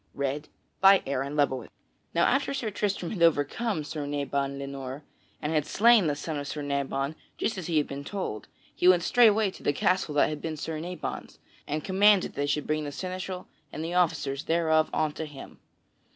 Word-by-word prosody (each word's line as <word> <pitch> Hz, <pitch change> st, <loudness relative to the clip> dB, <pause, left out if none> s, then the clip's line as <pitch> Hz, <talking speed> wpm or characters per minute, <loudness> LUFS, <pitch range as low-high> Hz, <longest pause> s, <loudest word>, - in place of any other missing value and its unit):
_ 140 Hz, +2 st, -2 dB, 1.7 s
Now 170 Hz, -, +4 dB
after 275 Hz, +1 st, +1 dB
Sir 235 Hz, -5 st, -2 dB
Tristram 195 Hz, -4 st, -2 dB
had 190 Hz, -, -5 dB
overcome 165 Hz, -, +2 dB
Sir 150 Hz, -1 st, -5 dB
Nabon 140 Hz, -1 st, -2 dB
le 140 Hz, -, -5 dB
Noir, 135 Hz, +1 st, -6 dB, 0.4 s
and 150 Hz, +2 st, -2 dB
had 155 Hz, -2 st, +2 dB
slain 225 Hz, -4 st, +5 dB
the 145 Hz, -, 0 dB
son 150 Hz, +1 st, -4 dB
of 145 Hz, -, -5 dB
Sir 150 Hz, 0 st, -4 dB
Nabon 140 Hz, 0 st, -1 dB, 0.3 s
as -, -, 0 dB
has 185 Hz, -4 st, -6 dB
been 155 Hz, -4 st, +1 dB
just 140 Hz, -, -10 dB
told, 190 Hz, -, -4 dB, 0.3 s
he 180 Hz, -, +2 dB
went 180 Hz, -2 st, +6 dB
straightway 220 Hz, -2 st, +4 dB
to -, -, -14 dB
the 145 Hz, -, +1 dB
castle 180 Hz, -1 st, +1 dB
that 145 Hz, -, +4 dB
had 150 Hz, -1 st, -5 dB
been 160 Hz, -1 st, -4 dB
Sir 155 Hz, +1 st, -4 dB
Nabon's, 175 Hz, +3 st, -6 dB, 0.3 s
and 150 Hz, +1 st, -2 dB
commanded 200 Hz, 0 st, +4 dB
that -, -, -27 dB
they 145 Hz, 0 st, -1 dB
should 145 Hz, +1 st, 0 dB
bring 155 Hz, 0 st, 0 dB
forth 145 Hz, -1 st, -5 dB
the -, -, -10 dB
seneschal 185 Hz, 0 st, -5 dB, 0.2 s
and 155 Hz, -, -5 dB
the 170 Hz, -, -4 dB
officers 155 Hz, -6 st, 0 dB
thereof 160 Hz, -1 st, +2 dB
unto 155 Hz, 0 st, -1 dB
him. 145 Hz, -3 st, -11 dB
155 Hz, 185 wpm, -28 LUFS, 145-185 Hz, 1.7 s, went